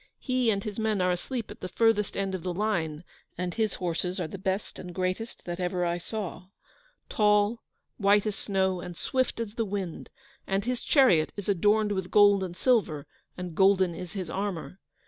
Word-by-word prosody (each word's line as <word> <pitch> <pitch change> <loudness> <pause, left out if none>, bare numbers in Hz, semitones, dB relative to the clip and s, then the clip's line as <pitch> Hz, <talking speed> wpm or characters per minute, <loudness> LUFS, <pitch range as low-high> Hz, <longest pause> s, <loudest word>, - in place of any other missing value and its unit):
He 255 -3 +1
and 200 -2 +1
his 210 0 -5
men 220 -2 +1
are 180 0 +3
asleep 225 +6 -3
at - - -10
the - - -3
furthest 220 0 +2
end 195 -1 -1
of 185 - -3
the 180 +1 -3
line, 170 -7 -1 0.3
and 180 0 -2
his 220 -3 0
horses 180 +1 -2
are 175 - -1
the 195 - -8
best 190 +1 -2
and 180 -1 -8
greatest 185 +5 -3
that 175 0 -4
ever 180 0 0
I 170 0 0
saw: 180 -2 -5 0.6
tall, 210 +1 +3 0.4
white 205 0 +4
as 210 -2 -1
snow, 190 -2 0
and 175 -2 -8
swift 260 -3 -1
as 225 -3 -3
the 230 - -1
wind, 195 -5 -4 0.4
and 195 +1 0
his 250 0 -1
chariot 245 - +4
is 205 - -5
adorned 210 +2 +3
with 190 -2 -2
gold 205 -1 +6
and 180 -1 -6
silver, 195 - +2 0.3
and 180 -2 -5
golden 190 0 +4
is 170 0 -7
his 185 -3 -4
armour. 195 -2 -4
195 Hz, 190 wpm, -28 LUFS, 180-210 Hz, 0.6 s, gold